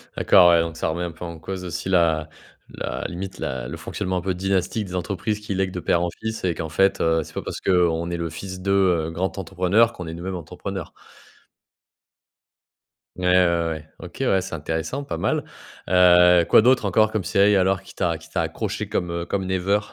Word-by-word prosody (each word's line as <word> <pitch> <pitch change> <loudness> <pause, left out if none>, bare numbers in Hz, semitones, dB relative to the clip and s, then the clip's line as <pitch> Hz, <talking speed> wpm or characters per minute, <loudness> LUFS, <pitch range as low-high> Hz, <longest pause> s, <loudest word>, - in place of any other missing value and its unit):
D'accord, 90 -3 +6
ouais. 85 -1 +5
Donc, 85 0 -4
ça - - -1
remet 85 +2 -2
un 85 - -3
peu 85 +2 -9
en 85 -1 -8
cause 95 +3 -6
aussi 90 +1 -4
la 80 -4 +2 0.4
la - - -5
limite, 95 +2 -7
la 65 -2 -4
le - - -6
fonctionnement 95 -3 -3
un - - -2
peu 95 +1 -1
dynastique 95 +3 -1
des 90 - -6
entreprises 100 +3 -2
qui 105 -1 -5
lèguent 95 0 0
de 90 - -5
père 85 -1 +1
en 90 - 0
fils 110 0 -4
et 90 -2 +1
qu'en 80 0 -5
fait, 95 +5 +2
heu, 80 0 +2
c'est - - -14
pas - - -3
parce - - -6
qu'on 85 -2 +2
est 85 - -2
le 85 0 -3
fils 95 +3 -7
de, 100 +1 -1
heu, 90 -5 +2
grand 90 +5 -3
entrepreneur 95 +5 +2
qu'on 90 - -7
est 80 - -5
nous-mêmes 90 +3 -5
entrepreneurs. 90 +2 -6 2.2
Ouais, 90 - -4
ouais, 90 -2 +3
ouais. 80 -1 -6
OK, - - -10
ouais. 95 - +2
C'est 90 - -7
intéressant 80 - -3
pas 85 -12 -5
mal, - - 0 0.5
heu, 90 -1 +6
quoi - - +7
d'autres 125 -1 +3
encore 110 +2 +3
comme 110 -3 -1
séries 100 +3 +3
alors 95 0 +2
qui - - -15
t'a 85 -3 0
qui 80 0 -16
t'a - - -1
accroché - - -3
comme, 90 - -1
heu, 85 0 -3
comme 95 0 -2
Never? 95 +2 +1
90 Hz, 215 wpm, -23 LUFS, 85-95 Hz, 2.2 s, quoi